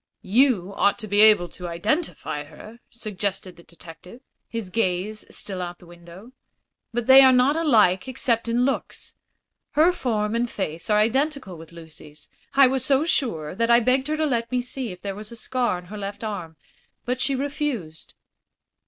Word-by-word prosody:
"You 205 Hz, -3 st, +2 dB
ought 200 Hz, 0 st, +2 dB
to 215 Hz, -, -7 dB
be 205 Hz, +1 st, +3 dB
able 215 Hz, -5 st, +6 dB
to 180 Hz, -, -8 dB
identify 170 Hz, -, -2 dB
her," 215 Hz, +10 st, -13 dB
suggested 200 Hz, -4 st, -4 dB
the 170 Hz, -, -16 dB
detective, 170 Hz, +6 st, -14 dB, 0.3 s
his 225 Hz, -5 st, -6 dB
gaze 210 Hz, 0 st, -1 dB
still 190 Hz, -2 st, -5 dB
out 175 Hz, 0 st, -5 dB
of -, -, -44 dB
the -, -, -18 dB
window. 175 Hz, +6 st, -14 dB, 0.6 s
"But 240 Hz, 0 st, -2 dB
they 265 Hz, +2 st, +9 dB
are 260 Hz, -1 st, +7 dB
not 255 Hz, +3 st, +3 dB
alike 215 Hz, -, +3 dB
except 235 Hz, -2 st, -1 dB
in 240 Hz, +2 st, +1 dB
looks. 275 Hz, -, -4 dB, 0.6 s
Her 315 Hz, +4 st, +5 dB
form 220 Hz, -10 st, -2 dB
and 235 Hz, +1 st, 0 dB
face 170 Hz, -5 st, -4 dB
are 210 Hz, -, +4 dB
identical 260 Hz, -, 0 dB
with 165 Hz, 0 st, -13 dB
Lucy's. 155 Hz, -3 st, -13 dB, 0.3 s
I 275 Hz, 0 st, +8 dB
was 260 Hz, 0 st, +1 dB
so 275 Hz, +3 st, +2 dB
sure 195 Hz, -, -1 dB
that 230 Hz, +4 st, -1 dB
I 235 Hz, 0 st, +6 dB
begged 255 Hz, +3 st, +1 dB
her 310 Hz, 0 st, -1 dB
to 310 Hz, -, +1 dB
let 235 Hz, -4 st, -1 dB
me 250 Hz, -, +1 dB
see 250 Hz, -2 st, -5 dB
if 180 Hz, -, -11 dB
there 200 Hz, -1 st, -3 dB
was 210 Hz, +2 st, -10 dB
a -, -, -9 dB
scar 240 Hz, -3 st, -1 dB
on 180 Hz, -, -11 dB
her 210 Hz, +4 st, -9 dB
left 200 Hz, +2 st, -6 dB
arm; 180 Hz, -7 st, -6 dB, 0.5 s
but 250 Hz, +1 st, -2 dB
she 275 Hz, -, 0 dB
refused." 265 Hz, -, -4 dB
215 Hz, 185 wpm, -23 LUFS, 180-255 Hz, 0.6 s, they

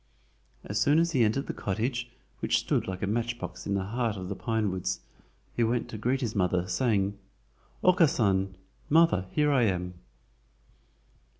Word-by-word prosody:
As 100 Hz, 0 st, -2 dB
soon 145 Hz, +2 st, +4 dB
as 170 Hz, +1 st, +3 dB
he 130 Hz, -7 st, +3 dB
entered 110 Hz, +6 st, +1 dB
the -, -, -4 dB
cottage, 120 Hz, +5 st, -2 dB, 0.3 s
which -, -, +2 dB
stood -, -, 0 dB
like 95 Hz, 0 st, -4 dB
a -, -, +3 dB
matchbox 120 Hz, +3 st, -3 dB
in 100 Hz, -, 0 dB
the 95 Hz, -, 0 dB
heart 115 Hz, +1 st, -1 dB
of 90 Hz, 0 st, -6 dB
the 100 Hz, -, -3 dB
pine 110 Hz, -1 st, -1 dB
woods, 90 Hz, -1 st, -2 dB, 0.5 s
he 120 Hz, -, +2 dB
went 115 Hz, +1 st, 0 dB
to 110 Hz, -, -6 dB
greet 130 Hz, +5 st, 0 dB
his 115 Hz, -4 st, -2 dB
mother, 90 Hz, -2 st, +1 dB
saying: 100 Hz, -2 st, 0 dB, 0.6 s
"Okkasan 105 Hz, -, +3 dB, 0.3 s
(mother), 160 Hz, -, +4 dB
here 150 Hz, -1 st, +3 dB
I 135 Hz, -3 st, +4 dB
am!" 90 Hz, -3 st, -1 dB
110 Hz, 165 wpm, -28 LUFS, 95-125 Hz, 0.6 s, soon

